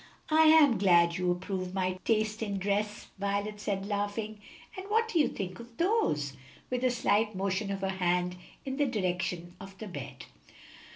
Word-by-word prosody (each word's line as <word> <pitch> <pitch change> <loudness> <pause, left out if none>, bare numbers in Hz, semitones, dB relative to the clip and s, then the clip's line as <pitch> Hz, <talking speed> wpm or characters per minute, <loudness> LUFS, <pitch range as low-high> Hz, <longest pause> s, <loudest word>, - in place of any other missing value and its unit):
"I 315 +1 +6
am 305 -8 +6
glad 170 -3 +4
you 180 -1 0
approve 185 +1 -2
my 185 -1 -1
taste 215 -1 +1
in 200 -3 -2
dress," 205 +2 -1
Violet 200 +1 -2
said, 200 -2 -2
laughing. 205 +1 -3 0.3
"And 380 +1 -7
what 450 +2 +3
do 360 -7 +1
you 295 - +5
think 185 0 -5
of 235 0 -12
those?" 335 - +1 0.4
with 250 0 -1
a 255 - +4
slight 220 -3 +1
motion 195 +2 -1
of 195 -1 -3
her 195 - 0
hand 180 -1 0 0.3
in 265 0 -3
the 290 -1 +2
direction 180 -5 -2
of 195 0 -11
the 215 - -7
bed. 185 - -8
200 Hz, 175 wpm, -30 LUFS, 185-230 Hz, 0.4 s, I